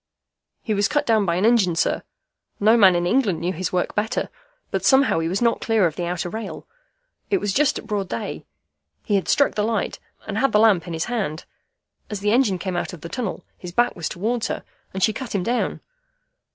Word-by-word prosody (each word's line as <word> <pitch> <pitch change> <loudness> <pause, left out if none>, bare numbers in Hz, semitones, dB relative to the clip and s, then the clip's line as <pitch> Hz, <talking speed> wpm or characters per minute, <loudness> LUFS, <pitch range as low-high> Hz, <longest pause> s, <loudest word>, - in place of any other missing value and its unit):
"He 220 - -1
was 200 0 +2
cut 295 0 0
down 220 -4 +2
by 170 - +1
an 185 +4 +1
engine, 220 -7 +4
sir. - - +1 0.6
No 215 +3 +5
man 195 -6 +6
in 175 0 +1
England 205 -4 +2
knew 175 +2 -1
his 180 0 -3
work 180 -1 -1
better. 220 +4 -1 0.4
But - - -1
somehow 265 -9 +4
he 165 - -1
was 190 +7 -1
not 235 -1 +2
clear 225 -4 +2
of 160 -3 -1
the 175 - -3
outer 175 0 -2
rail. 190 -4 -6 0.6
It 400 - +3
was 205 - -2
just 295 0 +2
at - - -8
broad 205 -4 -2
day. 115 - -4 0.6
He - - -2
had 195 -2 +1
struck 285 - +3
the 210 - -1
light, 220 -1 -1 0.3
and 215 0 -3
had 270 0 +2
the 210 - +5
lamp 205 -6 +4
in 170 - -5
his 160 0 -2
hand. 195 -10 -3 0.6
As 210 - -4
the 205 +1 +1
engine 225 -5 +3
came 185 0 -4
out 175 - -3
of 170 - -10
the 170 - -7
tunnel, 230 -4 -4
his 180 - -7
back 240 +5 +2
was 170 - -3
towards 225 +5 -1
her, - - -4 0.3
and 190 0 -3
she 220 - +3
cut 240 -1 -6
him 190 - 0
down. 240 +5 -1
205 Hz, 225 wpm, -22 LUFS, 180-230 Hz, 0.6 s, man